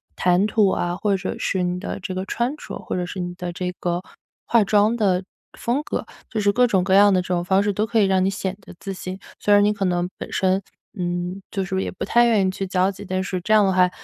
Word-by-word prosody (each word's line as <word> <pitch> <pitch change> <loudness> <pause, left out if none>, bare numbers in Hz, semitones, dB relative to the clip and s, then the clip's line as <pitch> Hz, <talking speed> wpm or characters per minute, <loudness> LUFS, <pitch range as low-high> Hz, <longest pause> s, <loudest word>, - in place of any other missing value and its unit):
谈 180 +2 +3
吐 215 -3 +3
啊， 175 -1 -1
或 205 +2 -1
者 185 - -4
是 185 -2 -1
你 180 0 -1
的 200 - -5
这 185 0 -5
个 185 - -2
穿 240 +8 -1
着， - - -8
或 - - -5
者 180 -1 -1
是 185 - -6
你 175 0 -3
的 180 -1 -5
这 180 +1 -3
个 175 0 -1 0.4
化 235 -2 +4
妆 210 +2 +3
的 190 -5 +1 0.4
风 250 +5 0
格， - - -3 0.2
就 220 - -2
是 205 -1 +3
各 250 +2 +4
种 190 -4 +2
各 190 0 +1
样 205 0 +7
的 185 - +3
这 180 - -9
种 175 -1 0
方 190 +2 +3
式 205 0 0
都 210 +3 0
可 225 0 +1
以 200 - +5
让 190 -1 +2
你 190 - +2
显 195 -1 -3
得 185 - -13
自 195 - -5
信。 185 0 -6 0.2
虽 205 - +3
然 205 0 +6
你 210 - +3
可 200 -2 -2
能 175 -1 0
本 - - -7
身， 190 +1 +1 0.4
嗯， 175 +2 -3
就 195 - -2
是 190 0 -1
也 - - -2
不 - - -5
太 240 0 +4
愿 220 -5 +3
意 - - 0
去 195 0 -4
交 185 +1 +2
际， 200 +1 -10
但 185 0 -1
是 185 -2 -3
这 215 - -4
样 210 -1 +6
的 190 - +2
话， 180 0 +4
190 Hz, 290 characters per minute, -22 LUFS, 180-205 Hz, 0.4 s, 样